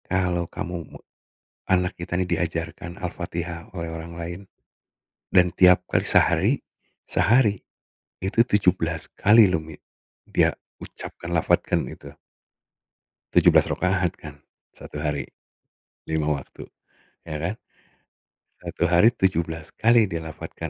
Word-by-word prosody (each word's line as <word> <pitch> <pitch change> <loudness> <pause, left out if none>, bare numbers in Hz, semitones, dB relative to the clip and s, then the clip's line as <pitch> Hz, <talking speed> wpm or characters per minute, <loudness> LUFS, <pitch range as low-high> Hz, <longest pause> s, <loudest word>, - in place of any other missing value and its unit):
Kalau 90 -2 0
kamu 90 +1 -5
me - - -12 0.7
anak 90 -1 +1
kita 85 0 -4
ini 95 - +1
diajarkan 85 +1 -3
Al-Fatihah 85 +2 -5
oleh 85 -1 -4
orang 80 +1 -7
lain, 85 +1 -6 0.9
dan 90 -1 +4
tiap 90 -1 +6
kali - - +1
sehari - - +4 0.5
sehari, 110 -4 +3 0.6
itu 95 +5 0
17x 105 +1 +3
loh 80 -3 0
mi 80 -1 -11 0.5
dia - - +3 0.3
ucapkan 85 - -9
lafazkan 80 -2 +1
itu. - - -11 1.2
17 - - +5
rakaat 90 -2 +1
kan 75 -2 -10 0.4
1 75 - -9
hari, 75 -2 -2 0.8
5 80 -1 -1
waktu 70 -2 -5 0.6
ya 80 -2 -5
kan? 90 +7 -3 1.0
1 - - -2
hari 90 +6 +5
17x 95 +5 +1
dilafazkan 80 -2 -6
85 Hz, 105 wpm, -24 LUFS, 80-95 Hz, 1.2 s, tiap